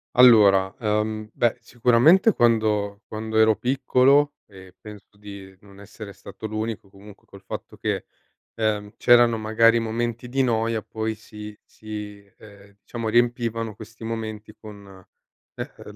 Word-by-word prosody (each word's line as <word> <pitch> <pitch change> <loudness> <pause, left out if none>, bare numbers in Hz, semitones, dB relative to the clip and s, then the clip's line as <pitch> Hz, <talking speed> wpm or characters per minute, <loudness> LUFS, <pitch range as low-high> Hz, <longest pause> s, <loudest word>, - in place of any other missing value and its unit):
Allora, 100 -6 +6
uhm, 110 0 -2
beh, 120 +1 0
sicuramente 125 - +4
quando 110 -3 +1
quando 110 0 -4
ero 110 -1 +5
piccolo 135 +3 +2
e 95 -2 -15
penso 105 -1 -13
di 100 -2 -11
non 100 -1 -17
essere 100 0 -11
stato 110 - -9
l'unico 110 -1 -5
comunque 100 +1 -16
col 100 0 -15
fatto 95 - -8
che, - - -3 0.5
ehm, 105 -2 -2
c'erano 120 -1 +5
magari 115 +2 +3
momenti 120 +1 -3
di 135 +2 -1
noia 115 -2 0
poi 110 +1 -4
si 105 -1 -11
si, 105 -2 -9
eh, 100 -1 -17
diciamo 115 -2 -6
riempivano 115 -1 0
questi 110 +1 -13
momenti 110 -1 -6
con, 100 -3 -13 0.5
ehm, - - -9
110 Hz, 130 wpm, -23 LUFS, 105-115 Hz, 0.5 s, Allora